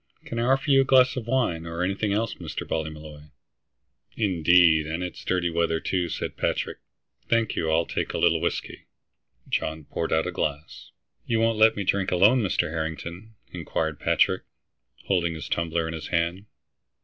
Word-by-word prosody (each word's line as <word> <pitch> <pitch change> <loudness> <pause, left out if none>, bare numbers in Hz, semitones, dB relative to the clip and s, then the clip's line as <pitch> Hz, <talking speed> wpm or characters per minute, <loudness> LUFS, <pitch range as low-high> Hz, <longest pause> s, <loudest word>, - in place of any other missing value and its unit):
"Can 115 - -4
I 120 +2 +2
offer 135 +2 +1
you 135 0 +6
a - - +3
glass 130 -1 +4
of 120 -3 -5
wine, 115 -11 0
or 85 +1 -3
anything 100 +3 -1
else, 110 +2 0
Mr. - - -6
Ballymolloy?" 75 -1 -5 0.9
"Indeed, 85 -5 +4
and 80 +3 -3
it's 90 -2 -7
dirty 90 -2 0
weather, 85 -1 +1
too," 90 -1 -1
said - - -4
Patrick. - - -2 0.5
"Thank 115 -2 +1
you, 80 - -1
I'll 80 +1 +2
take - - -3
a - - -3
little - - +3
whiskey." - - -3 0.6
John 80 0 -2
poured 80 +3 -4
out 80 0 +2
a - - -2
glass. 75 +1 -4 0.4
"You 115 -1 +1
won't 115 -1 +1
let 110 +1 +6
me 100 - -2
drink 95 0 +1
alone, 105 +8 +5
Mr. 85 -5 0
Harrington?" 85 +6 -5 0.2
inquired 80 -2 -3
Patrick, - - +2 0.6
holding 85 -4 0
his 80 - -7
tumbler 85 -1 -1
in 80 - -4
his 80 -2 -6
hand. 85 +4 -1
85 Hz, 175 wpm, -25 LUFS, 80-110 Hz, 0.9 s, you